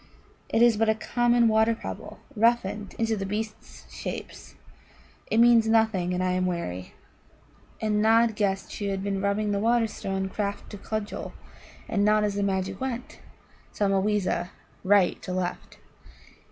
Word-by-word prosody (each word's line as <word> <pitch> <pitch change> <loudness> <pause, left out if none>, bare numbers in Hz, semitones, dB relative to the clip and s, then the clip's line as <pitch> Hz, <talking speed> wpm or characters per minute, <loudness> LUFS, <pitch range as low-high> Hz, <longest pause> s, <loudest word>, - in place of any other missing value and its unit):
It 225 - +3
is 235 -3 +5
but 225 0 +2
a 220 - +3
common 240 +1 +2
water 220 +1 +3
pebble - - -8 0.2
roughened 215 -2 +1
into 225 -1 0
the 195 - -4
beasts' 215 +2 -6
shapes. - - -7 0.7
It - - +1
means 235 -1 +6
nothing, 220 -5 +2
and 180 0 -1
I 185 - +1
am 185 0 0
weary." 90 - -4 0.8
And 210 -1 0
Nod 225 0 +4
guessed 195 -2 -1
she 205 - -4
had 195 -1 -2
been 200 -1 -2
rubbing 205 +1 0
the 200 - 0
Wonderstone 215 -4 0
craft 200 +1 -4
to 205 - -8
cudgel, 215 0 -5 0.5
and 205 -2 0
not 210 0 +4
as 205 -1 0
the 200 - -2
magic 190 0 -1
went, 250 -2 -5 0.5
sama 195 -2 +1
weeza 190 -4 0 0.3
right 195 -2 +3
to 185 - -5
left. 180 -1 -4
210 Hz, 155 wpm, -26 LUFS, 195-225 Hz, 0.8 s, means